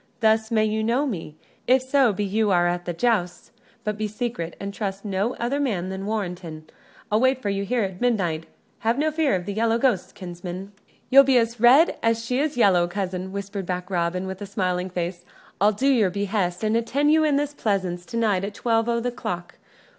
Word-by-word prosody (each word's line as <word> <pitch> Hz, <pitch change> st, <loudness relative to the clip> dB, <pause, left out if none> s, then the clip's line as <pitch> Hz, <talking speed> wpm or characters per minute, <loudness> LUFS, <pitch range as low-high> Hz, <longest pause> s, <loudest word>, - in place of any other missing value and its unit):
Thus 220 Hz, -1 st, +3 dB
may 215 Hz, -2 st, +2 dB
you 215 Hz, 0 st, -1 dB
know 240 Hz, +6 st, +1 dB
me, 165 Hz, -, -5 dB, 0.3 s
if 255 Hz, +1 st, +4 dB
so 265 Hz, -2 st, +3 dB
be 205 Hz, +1 st, -2 dB
you 210 Hz, +2 st, +1 dB
are 175 Hz, -2 st, +3 dB
at 175 Hz, 0 st, -1 dB
the 175 Hz, -, -2 dB
jousts; 180 Hz, -3 st, -1 dB, 0.3 s
but 210 Hz, -2 st, -3 dB
be 215 Hz, -, 0 dB
secret, 215 Hz, -6 st, -4 dB
and 200 Hz, 0 st, -5 dB
trust 200 Hz, -1 st, -4 dB
no 200 Hz, +4 st, -1 dB
other 245 Hz, +5 st, -1 dB
man 200 Hz, -10 st, -1 dB
than 190 Hz, +1 st, -5 dB
Warrenton. 180 Hz, -7 st, -4 dB, 0.5 s
I'll 210 Hz, -, +3 dB
wait 260 Hz, -1 st, +1 dB
you 200 Hz, -1 st, 0 dB
here 235 Hz, +3 st, 0 dB
at 190 Hz, -2 st, -5 dB
midnight 180 Hz, -10 st, 0 dB, 0.3 s
have 230 Hz, +3 st, 0 dB
no 310 Hz, +2 st, +1 dB
fear 305 Hz, -7 st, +1 dB
of 180 Hz, -1 st, -3 dB
the 200 Hz, -, -3 dB
yellow 225 Hz, +2 st, +1 dB
ghost, 235 Hz, -7 st, 0 dB
kinsman!" 180 Hz, +1 st, -7 dB, 0.4 s
"You'll 275 Hz, +1 st, +9 dB
be 265 Hz, -2 st, +4 dB
as 230 Hz, 0 st, 0 dB
red 260 Hz, +8 st, +5 dB
as 230 Hz, 0 st, +1 dB
she 250 Hz, +2 st, 0 dB
is 300 Hz, -1 st, -1 dB
yellow, 185 Hz, -6 st, +4 dB
cousin," 185 Hz, 0 st, -4 dB
whispered 200 Hz, -1 st, -5 dB
back 180 Hz, +1 st, -4 dB
Robin, 180 Hz, +1 st, -1 dB
with 190 Hz, +1 st, -6 dB
smiling 185 Hz, -2 st, -1 dB
face. 175 Hz, 0 st, -4 dB, 0.4 s
"I'll 205 Hz, +1 st, +5 dB
do 215 Hz, +7 st, -1 dB
your 225 Hz, -8 st, +4 dB
behest, 195 Hz, -1 st, -2 dB
and 215 Hz, +1 st, +1 dB
attend 275 Hz, +6 st, +1 dB
you 315 Hz, 0 st, +4 dB
in 300 Hz, -2 st, +2 dB
this 290 Hz, +1 st, 0 dB
pleasance 190 Hz, -8 st, -1 dB
to 230 Hz, -, -5 dB
night 210 Hz, -5 st, +1 dB
at 205 Hz, +1 st, -4 dB
twelve 225 Hz, +1 st, +1 dB
o' 235 Hz, 0 st, +1 dB
th' 245 Hz, 0 st, -3 dB
clock. 175 Hz, 0 st, -5 dB
205 Hz, 205 wpm, -24 LUFS, 185-235 Hz, 0.5 s, You'll